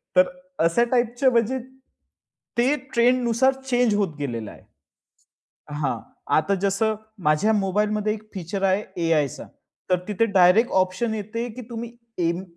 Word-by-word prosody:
तर 185 0 +6
अ, 275 -4 -7
अशा 170 +8 +3
टाइपच 245 +1 0
म्हणजे 250 -1 +3 1.0
ते 255 +5 +3 0.2
ट्रेंड 245 +2 +4
नुसार 240 +3 +3
चेंज 245 -4 +2
होत 195 -7 0
गेलेलं 115 -7 -4
आहे. - - -15 1.1
हां. 140 -5 -1 0.4
आता 155 +6 +2
जसं 200 +2 +1 0.3
माझ्या 155 +9 +3
मोबाईलमध्ये 210 +2 0
एक 215 - -9
फीचर 190 +1 -4
आहे, 195 +2 +2 0.2
ए-आयचं 155 -5 0 0.4
तर 180 - +4
तिथे 210 +2 +1
डायरेक्ट 190 +5 +5
ऑप्शन 185 +5 -2
येते, 220 +3 -4
की 250 +3 -9
तुम्ही 235 0 -6 0.4
एम 170 +2 -2
210 Hz, 140 wpm, -24 LUFS, 180-235 Hz, 1.1 s, तर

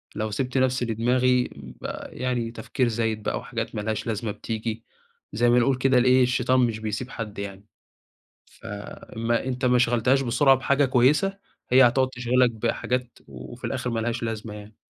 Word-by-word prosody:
لو 110 0 -2
سِبت 130 +4 -2
نفسي 130 -1 +1
لدماغي 125 +2 +2
ب 65 -3 -12 0.2
يعني 125 -2 -3
تفكير 120 +3 -1
زايد 110 -2 -1
بقى - - -1
أو - - -4
حاجات - - -5
ما 105 - -2
لهاش 110 +1 -3
لازمة 110 -1 -2
بتيجي، 110 +1 -5 0.5
زي 120 +3 +2
ما 120 +1 +5
نقول 130 +2 +2
كده 130 0 +3
لإيه 130 +1 +5
الشيطان 125 +1 +2
مش 115 -3 +1
بيسيب 110 +3 -4
حد 105 -4 -6
يعني، 100 0 -7 0.8
ف - - -15 0.5
ما 115 +1 0
أنت 130 0 -3
ما 125 -1 +4
شغلتهاش 125 +2 +3
بسرعة 135 +2 +4
بحاجة 140 +2 +2
كويسة، 145 +10 +2 0.3
هي 130 0 +7
هتقعد 130 +2 +1
تِشغلك 125 0 +2
بحاجات 120 +2 -2
و 65 -1 -10
وفي - - -12
الآخر 125 - -3
ما 115 -1 -1
لهاش 115 +1 -2
لازمة 110 -1 -4
يعني. 105 +1 -11
120 Hz, 175 wpm, -25 LUFS, 110-130 Hz, 0.8 s, هي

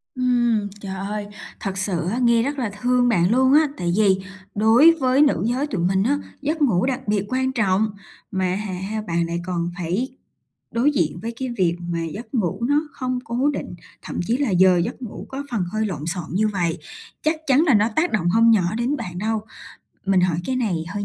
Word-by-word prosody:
Ừm, 240 -4 +1
trời 190 -1 -5
ơi, 205 +2 -4 0.3
thật 195 -1 -4
sự 185 -3 -1
á, 230 - -1
nghe 235 -2 +3
rất 285 +2 -2
là 235 -4 -1
thương 250 0 +3
bạn 180 -4 +3
luôn 260 +2 +4
á. 305 +1 +6
Tại 175 -1 -1
vì 195 -3 +4 0.4
đối 225 +10 +6
với 260 +1 +3
nữ 295 -2 +3
giới 255 +5 0
tụi 200 -11 -3
mình 190 +1 +2
á, 280 +6 +2 0.2
giấc 305 +3 -2
ngủ 220 -10 +3
đặc 260 -1 -2
biệt 205 -1 +1
quan 260 0 0
trọng, 215 -3 +1 0.4
mà 190 -2 0
hả 205 -1 -4
ha, 195 +4 -4
bạn 170 -4 -1
lại 170 +1 -3
còn 175 -2 -2
phải 185 +9 -2 0.6
đối 250 +6 +2
diện 170 - 0
với 230 +2 -4
cái 260 -1 -2
việc 175 -3 +2 0.2
về 165 -1 -2
giấc 225 +3 -9
ngủ 190 -4 0
nó 290 +2 +3
không 255 -3 -3
cố 250 +5 0
định, 175 - -5 0.3
thậm - - -5
chí 235 +3 +2
là 280 -3 0
giờ 185 -1 +5
giấc 170 +8 -2
ngủ 235 -4 -7
có 270 +1 -5
phần 220 -6 0
hơi 215 0 0
lộn 175 -8 -4
xộn 175 +1 -3
như 215 +4 +2
vậy, 175 -6 -1 0.4
chắc 310 +1 +1
chắn 275 +3 +5
là 280 - +5
nó 210 +1 +4
tác 340 +3 +2
động 175 -6 +1
hông 230 +4 +5
nhỏ 190 -3 +2
đến 250 +5 0
bạn 180 -7 -6
đâu. 220 +3 -1 0.7
Mình 195 -1 +4
hỏi 180 -3 +2
cái 260 - -1
này 225 -7 0
hơi 205 +2 -4
215 Hz, 215 wpm, -22 LUFS, 185-255 Hz, 0.7 s, á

